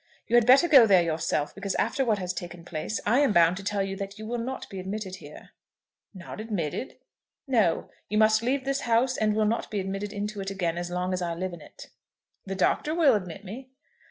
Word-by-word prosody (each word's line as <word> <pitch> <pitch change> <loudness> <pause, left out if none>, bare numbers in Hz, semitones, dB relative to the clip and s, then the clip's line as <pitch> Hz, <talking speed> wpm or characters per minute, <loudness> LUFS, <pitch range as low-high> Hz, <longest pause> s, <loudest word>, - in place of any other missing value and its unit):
You 235 - 0
had 240 -1 +5
better 270 +7 +7
go 270 -8 +8
there 190 -4 +5
yourself, 160 -2 -1
because 200 - -4
after 270 - 0
what 220 -4 +1
has 185 -2 -3
taken 175 -1 -8
place, 175 +5 -4
I 245 +5 +3
am 285 -5 +3
bound 170 0 +5
to 195 - -7
tell 200 0 -1
you 195 0 -4
that 200 +1 -6
you 215 - -8
will 240 +2 -3
not 260 +3 -5
be 195 - -7
admitted 190 0 -5
here." 150 -1 -13 0.6
"Not 185 0 -9
admitted?" 215 - -4 0.5
"No. 220 -11 +2 0.2
You 210 - 0
must 215 0 +4
leave 260 +3 -1
this 275 0 0
house, 240 +2 +2
and 215 -2 +1
will 215 0 +2
not 225 +2 -1
be 210 - -2
admitted 195 +2 -4
into 205 0 -4
it 195 - -4
again 180 -4 -2
as 175 0 -4
long 180 +1 -2
as 185 - -2
I 170 -1 -2
live 185 +1 -4
in 170 - -9
it." - - -13 0.6
"The 195 - -3
Doctor 300 - +1
will 315 -6 +5
admit 195 -1 -4
me." 250 +7 -8
200 Hz, 225 wpm, -27 LUFS, 180-230 Hz, 0.6 s, go